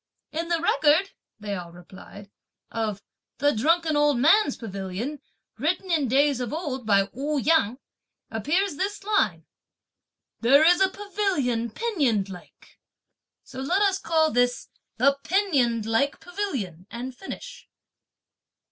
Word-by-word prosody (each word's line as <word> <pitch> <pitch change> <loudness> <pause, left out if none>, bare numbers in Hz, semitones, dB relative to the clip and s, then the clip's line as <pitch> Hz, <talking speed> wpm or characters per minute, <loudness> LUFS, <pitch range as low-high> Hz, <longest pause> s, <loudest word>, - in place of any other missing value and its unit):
"In 330 +2 -3
the 340 -1 +1
record," 320 +3 +3 0.3
they 210 -1 -4
all 175 -3 -6
replied, 190 +3 -13 0.4
"of 215 -3 -3 0.3
the 290 0 +3
'Drunken 320 +7 +2
Old 295 -2 +3
Man's 310 - +4
Pavilion,' 205 +6 -5 0.4
written 350 +6 -1
in 305 -5 +2
days 275 +2 +3
of 245 -3 -3
old 275 -7 -4
by 200 -2 +4
Ou 290 +3 -2
Yang, 270 -5 +2 0.5
appears 295 - 0
this 400 +3 -3
line: 420 0 0 0.9
'There 275 +6 +5
is 355 +3 +5
a 380 - +5
pavilion 365 - -1
pinioned 245 - 0
like,' 180 -2 -14 0.6
so 260 - -10
let 360 +9 +1
us 385 -1 +2
call 320 -3 +2
this 245 0 0 0.3
'the 275 +3 +3
pinioned 275 - +1
like 225 +6 0
pavilion,' 260 - -5
and 250 +2 -6
finish." - - -9
280 Hz, 130 wpm, -25 LUFS, 225-345 Hz, 0.9 s, There